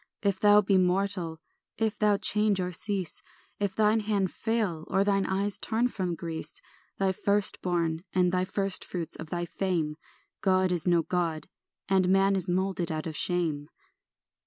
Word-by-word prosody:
If 200 Hz, -2 st, +1 dB
thou 210 Hz, 0 st, +6 dB
be 195 Hz, -1 st, +3 dB
mortal, 180 Hz, -2 st, +1 dB, 0.4 s
if 220 Hz, -1 st, -1 dB
thou 210 Hz, -1 st, +3 dB
change 210 Hz, -1 st, +2 dB
or 180 Hz, 0 st, -2 dB
cease, 190 Hz, -1 st, -3 dB, 0.4 s
If 200 Hz, -2 st, -1 dB
thine 215 Hz, +1 st, +3 dB
hand 205 Hz, -3 st, 0 dB
fail, 215 Hz, -8 st, -2 dB
or 195 Hz, +1 st, +2 dB
thine 195 Hz, -1 st, +1 dB
eyes 195 Hz, +1 st, 0 dB
turn 235 Hz, +2 st, 0 dB
from 185 Hz, -7 st, -3 dB
Greece, 160 Hz, -1 st, -6 dB, 0.4 s
Thy 195 Hz, -1 st, +1 dB
firstborn, 180 Hz, -4 st, +1 dB
and 180 Hz, -1 st, +2 dB
the 185 Hz, 0 st, +1 dB
firstfruits 185 Hz, -3 st, -1 dB
of 160 Hz, -, -8 dB
thy 175 Hz, +1 st, -2 dB
fame, 170 Hz, -4 st, -2 dB, 0.4 s
God 185 Hz, -2 st, +2 dB
is 175 Hz, -1 st, -1 dB
no 170 Hz, -2 st, +3 dB
God, 170 Hz, -3 st, -2 dB, 0.4 s
and 190 Hz, -2 st, +2 dB
man 195 Hz, +1 st, +3 dB
is 185 Hz, -1 st, -2 dB
moulded 185 Hz, -1 st, -1 dB
out 155 Hz, 0 st, -3 dB
of 160 Hz, -2 st, -5 dB
shame. 160 Hz, -4 st, -1 dB
190 Hz, 160 wpm, -28 LUFS, 175-200 Hz, 0.4 s, thou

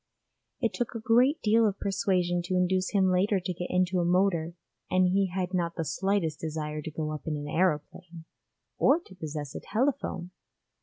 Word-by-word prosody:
It 230 Hz, -, +1 dB
took 240 Hz, -1 st, -3 dB
a -, -, -2 dB
great 250 Hz, +7 st, +3 dB
deal 225 Hz, +1 st, +4 dB
of 200 Hz, -1 st, -2 dB
persuasion 185 Hz, -3 st, 0 dB
to 185 Hz, -, -1 dB
induce 185 Hz, +1 st, +1 dB
him 190 Hz, -3 st, +3 dB
later 195 Hz, +2 st, +2 dB
to 180 Hz, 0 st, -3 dB
get 175 Hz, +1 st, -5 dB
into 180 Hz, 0 st, +1 dB
a -, -, +2 dB
motor 175 Hz, -2 st, +1 dB, 0.3 s
and 185 Hz, 0 st, +3 dB
he 195 Hz, +1 st, +2 dB
had 180 Hz, 0 st, -3 dB
not 170 Hz, -2 st, -1 dB
the 165 Hz, -, -2 dB
slightest 190 Hz, -3 st, 0 dB
desire 155 Hz, -1 st, -4 dB
to 155 Hz, -, -6 dB
go 155 Hz, 0 st, -3 dB
up 155 Hz, 0 st, -7 dB
in 155 Hz, -, -1 dB
an 145 Hz, 0 st, -6 dB
aeroplane 165 Hz, +1 st, -1 dB, 0.5 s
or 295 Hz, +5 st, +5 dB
to 210 Hz, -, -16 dB
possess 150 Hz, -5 st, -6 dB
a -, -, -5 dB
telephone. 240 Hz, -8 st, -1 dB
180 Hz, 190 wpm, -28 LUFS, 165-200 Hz, 0.5 s, or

